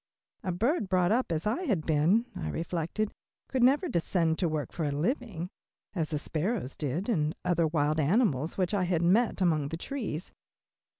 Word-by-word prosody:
A 185 Hz, -, -1 dB
bird 220 Hz, -, 0 dB
brought 180 Hz, -1 st, +3 dB
up 245 Hz, -3 st, +1 dB
as 160 Hz, +2 st, -1 dB
I 225 Hz, +11 st, 0 dB
had 195 Hz, -, 0 dB
been, 165 Hz, +9 st, +3 dB
I 80 Hz, -, -3 dB
reflected, 170 Hz, -, -2 dB, 0.4 s
could 260 Hz, -, -1 dB
never 280 Hz, +9 st, +4 dB
descend 165 Hz, -, +1 dB
to 175 Hz, -, +2 dB
work 155 Hz, -2 st, -2 dB
for 170 Hz, -, -3 dB
a 150 Hz, -, +1 dB
living, 180 Hz, -, -2 dB, 0.4 s
as 165 Hz, -6 st, -1 dB
the 155 Hz, -, -1 dB
sparrows 160 Hz, -, -2 dB
did, 150 Hz, +7 st, -2 dB
and 155 Hz, -9 st, +1 dB
other 170 Hz, -2 st, +2 dB
wild 150 Hz, -1 st, +1 dB
birds 160 Hz, -, +2 dB
which 185 Hz, +1 st, 0 dB
I 195 Hz, -3 st, +2 dB
had 175 Hz, -2 st, +1 dB
met 200 Hz, +4 st, +3 dB
among 155 Hz, -5 st, +2 dB
the 165 Hz, -, -4 dB
trees. 205 Hz, -, -4 dB
175 Hz, 180 wpm, -29 LUFS, 155-215 Hz, 0.4 s, never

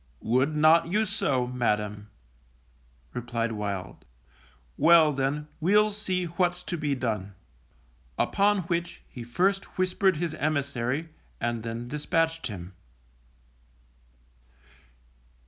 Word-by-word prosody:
Would 130 Hz, +7 st, +2 dB
not 155 Hz, +2 st, +5 dB
you 210 Hz, +5 st, +1 dB
so, 140 Hz, -, 0 dB
Madam_, 105 Hz, -4 st, -1 dB, 1.1 s
replied 120 Hz, -1 st, -2 dB
Wild. 100 Hz, -4 st, -4 dB, 0.7 s
Well, 160 Hz, -2 st, +6 dB
then, 140 Hz, +2 st, -1 dB
we'll 210 Hz, +6 st, +4 dB
see 190 Hz, -3 st, -2 dB
what's 175 Hz, +1 st, -1 dB
to 175 Hz, -, -3 dB
be 150 Hz, -3 st, -1 dB
done. 105 Hz, -6 st, -3 dB, 0.8 s
Upon 205 Hz, 0 st, +2 dB
which 170 Hz, 0 st, -3 dB
he 120 Hz, -, -9 dB
first 190 Hz, +14 st, 0 dB
whispered 185 Hz, -1 st, +2 dB
his 165 Hz, -1 st, -2 dB
emissary, 140 Hz, -1 st, -1 dB, 0.3 s
and 120 Hz, -1 st, -1 dB
then 115 Hz, +1 st, -5 dB
dispatched 165 Hz, +4 st, 0 dB
him. 95 Hz, -3 st, -8 dB
150 Hz, 100 wpm, -27 LUFS, 120-175 Hz, 1.1 s, Well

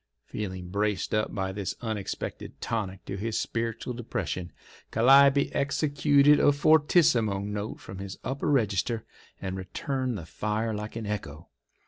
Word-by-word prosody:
Feeling 95 Hz, -4 st, -5 dB
braced 100 Hz, 0 st, -1 dB
up 105 Hz, 0 st, +1 dB
by 95 Hz, -2 st, -1 dB
this 100 Hz, 0 st, -4 dB
unexpected 110 Hz, -5 st, -5 dB
tonic 100 Hz, -4 st, -3 dB
to 95 Hz, -, -4 dB
his 110 Hz, +3 st, -2 dB
spiritual 115 Hz, +1 st, -3 dB
depression, 100 Hz, -6 st, -4 dB, 0.4 s
Calliope 140 Hz, +4 st, +5 dB
executed 145 Hz, 0 st, +3 dB
a -, -, +6 dB
fortissimo 145 Hz, -, +4 dB
note 105 Hz, +1 st, -4 dB
from 95 Hz, +1 st, -9 dB
his 95 Hz, 0 st, -6 dB
upper 135 Hz, +2 st, -2 dB
register, 115 Hz, -3 st, +1 dB, 0.3 s
and 95 Hz, -1 st, -4 dB
returned 125 Hz, +6 st, -3 dB
the 85 Hz, -, -7 dB
fire 110 Hz, +6 st, -2 dB
like 105 Hz, +1 st, -5 dB
an 115 Hz, -1 st, -4 dB
echo. 85 Hz, -7 st, -5 dB
110 Hz, 135 wpm, -28 LUFS, 100-130 Hz, 0.4 s, a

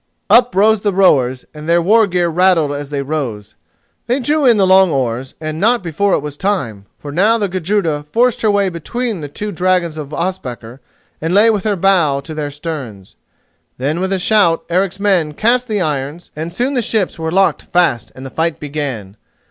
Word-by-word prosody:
Up 245 Hz, -1 st, +5 dB
rose 215 Hz, +2 st, +3 dB
the 205 Hz, -2 st, -1 dB
rowers, 130 Hz, -10 st, +2 dB
and 150 Hz, +1 st, -8 dB
their 170 Hz, +1 st, +4 dB
war 215 Hz, +5 st, +4 dB
gear 175 Hz, -2 st, 0 dB
rattled 170 Hz, -3 st, +2 dB
as 145 Hz, -1 st, -5 dB
they 140 Hz, -1 st, -3 dB
rose. 125 Hz, -8 st, -4 dB, 0.5 s
They 250 Hz, +3 st, +1 dB
drew 290 Hz, +2 st, +1 dB
in 235 Hz, -3 st, +5 dB
the 195 Hz, -, +3 dB
long 190 Hz, 0 st, +5 dB
oars, 130 Hz, -2 st, -2 dB
and 155 Hz, 0 st, -5 dB
not 230 Hz, +2 st, +2 dB
before 185 Hz, +4 st, 0 dB
it -, -, -2 dB
was 150 Hz, -1 st, -7 dB
time, 125 Hz, -, -2 dB
for 145 Hz, -, -8 dB
now 205 Hz, +9 st, +3 dB
the 205 Hz, -3 st, -1 dB
Gudruda 180 Hz, -4 st, -1 dB
forced 240 Hz, +5 st, +1 dB
her 220 Hz, -, +2 dB
way 200 Hz, -1 st, +2 dB
between 215 Hz, +4 st, -4 dB
the 145 Hz, -, -5 dB
two 210 Hz, +9 st, -5 dB
dragons 180 Hz, -3 st, 0 dB
of 145 Hz, -1 st, -7 dB
Ospakar 135 Hz, -9 st, -5 dB, 0.4 s
and 165 Hz, +4 st, -1 dB
lay 220 Hz, +3 st, +6 dB
with 210 Hz, -2 st, -2 dB
her 210 Hz, -2 st, +1 dB
bow 170 Hz, -7 st, +2 dB
to 155 Hz, +3 st, -8 dB
their 150 Hz, -2 st, -4 dB
sterns. 140 Hz, -, -7 dB, 0.6 s
Then 145 Hz, +6 st, -2 dB
with 190 Hz, +1 st, -2 dB
a 195 Hz, -, +1 dB
shout 185 Hz, -3 st, +2 dB
Eric's 190 Hz, +2 st, 0 dB
men 180 Hz, -7 st, +1 dB
cast 245 Hz, +5 st, +1 dB
the 210 Hz, -4 st, -1 dB
irons 150 Hz, +1 st, -3 dB
and 160 Hz, +3 st, -5 dB
soon 245 Hz, +10 st, -1 dB
the 250 Hz, -, +1 dB
ships 215 Hz, -6 st, -1 dB
were 160 Hz, 0 st, -2 dB
locked 195 Hz, +3 st, +2 dB
fast 175 Hz, -10 st, 0 dB
and 130 Hz, -, -10 dB
the 135 Hz, -, -8 dB
fight 165 Hz, +1 st, -1 dB
began. 135 Hz, -9 st, -5 dB
170 Hz, 200 wpm, -16 LUFS, 145-200 Hz, 0.6 s, lay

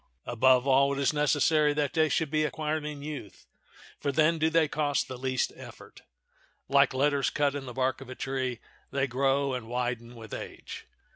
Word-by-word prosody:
Above 125 Hz, +2 st, +3 dB
all, 140 Hz, +1 st, +4 dB
it -, -, -4 dB
is 140 Hz, +2 st, +2 dB
necessary 150 Hz, 0 st, +3 dB
that 145 Hz, -2 st, 0 dB
they 160 Hz, -1 st, +3 dB
should 155 Hz, +1 st, 0 dB
be 155 Hz, 0 st, +2 dB
acquired 155 Hz, 0 st, -2 dB
in 150 Hz, -1 st, -6 dB
youth, 145 Hz, -9 st, -8 dB, 0.5 s
for 140 Hz, -, -1 dB
then 155 Hz, +3 st, +3 dB
do 160 Hz, +1 st, +3 dB
they 160 Hz, -1 st, +3 dB
cost 145 Hz, -2 st, 0 dB
the 130 Hz, -, -6 dB
least 130 Hz, 0 st, -1 dB
effort. -, -, -13 dB, 0.7 s
Like 140 Hz, -1 st, +4 dB
letters 140 Hz, 0 st, +2 dB
cut 145 Hz, -2 st, +1 dB
in 140 Hz, -2 st, -6 dB
the 125 Hz, -, -6 dB
bark 130 Hz, +2 st, -1 dB
of 135 Hz, -, -10 dB
a 130 Hz, -, -7 dB
tree, 130 Hz, -2 st, -2 dB, 0.3 s
they 140 Hz, 0 st, 0 dB
grow 135 Hz, +1 st, +1 dB
and 125 Hz, -3 st, -5 dB
widen 120 Hz, 0 st, -3 dB
with 110 Hz, -2 st, -10 dB
age. -, -, -8 dB
140 Hz, 190 wpm, -28 LUFS, 130-150 Hz, 0.7 s, all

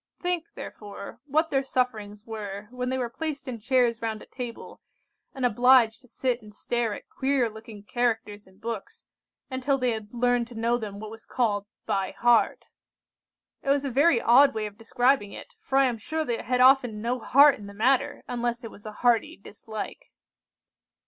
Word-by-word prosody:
Think, 355 Hz, -2 st, -1 dB
therefore, 205 Hz, +1 st, -9 dB
what 315 Hz, +3 st, +1 dB
their 270 Hz, -, +2 dB
sufferings 220 Hz, -6 st, -2 dB
were 210 Hz, -2 st, -6 dB
when 250 Hz, 0 st, -3 dB
they 260 Hz, -, -1 dB
were 250 Hz, -2 st, -1 dB
placed 290 Hz, +3 st, -5 dB
in 240 Hz, -3 st, -4 dB
chairs 240 Hz, 0 st, +2 dB
round 220 Hz, -1 st, -2 dB
a -, -, -14 dB
table, 245 Hz, -3 st, -8 dB, 0.5 s
and 260 Hz, -2 st, -1 dB
obliged 245 Hz, 0 st, +5 dB
to 250 Hz, -, -20 dB
sit 250 Hz, 0 st, -1 dB
and 210 Hz, -1 st, -13 dB
stare 230 Hz, +1 st, -2 dB
at -, -, -12 dB
queer 265 Hz, -2 st, +1 dB
looking 220 Hz, -1 st, -11 dB
characters 225 Hz, -3 st, -2 dB
in 190 Hz, 0 st, -21 dB
books 230 Hz, -, -6 dB, 0.5 s
until 260 Hz, +2 st, 0 dB
they 250 Hz, -2 st, +1 dB
had 220 Hz, -2 st, -5 dB
learned 245 Hz, -1 st, +1 dB
to 240 Hz, -, -12 dB
know 235 Hz, +2 st, +1 dB
them 205 Hz, -3 st, -6 dB
what 215 Hz, 0 st, -7 dB
was 225 Hz, 0 st, -12 dB
called 205 Hz, -5 st, 0 dB, 0.2 s
by 195 Hz, -1 st, -1 dB
heart. 240 Hz, -1 st, +2 dB, 0.9 s
It -, -, -4 dB
was 280 Hz, 0 st, +2 dB
a 275 Hz, -, -2 dB
very 280 Hz, +1 st, +4 dB
odd 270 Hz, +5 st, +6 dB
way 215 Hz, -1 st, -1 dB
of 205 Hz, -1 st, -7 dB
describing 240 Hz, -1 st, +1 dB
it, -, -, -10 dB
for 270 Hz, -, -1 dB
I 275 Hz, -, +6 dB
am 240 Hz, -3 st, -1 dB
sure 315 Hz, +8 st, -2 dB
they 235 Hz, -3 st, -2 dB
had 250 Hz, 0 st, 0 dB
often 255 Hz, -4 st, +5 dB
no 245 Hz, +2 st, -1 dB
heart 280 Hz, +3 st, +6 dB
in 205 Hz, -, -9 dB
the 200 Hz, -, -10 dB
matter, 270 Hz, +6 st, +1 dB
unless 240 Hz, 0 st, -2 dB
it 225 Hz, -, -7 dB
was 205 Hz, -, -12 dB
a -, -, -5 dB
hearty 235 Hz, -2 st, +3 dB
dislike. 215 Hz, +1 st, -8 dB
240 Hz, 190 wpm, -26 LUFS, 220-260 Hz, 0.9 s, odd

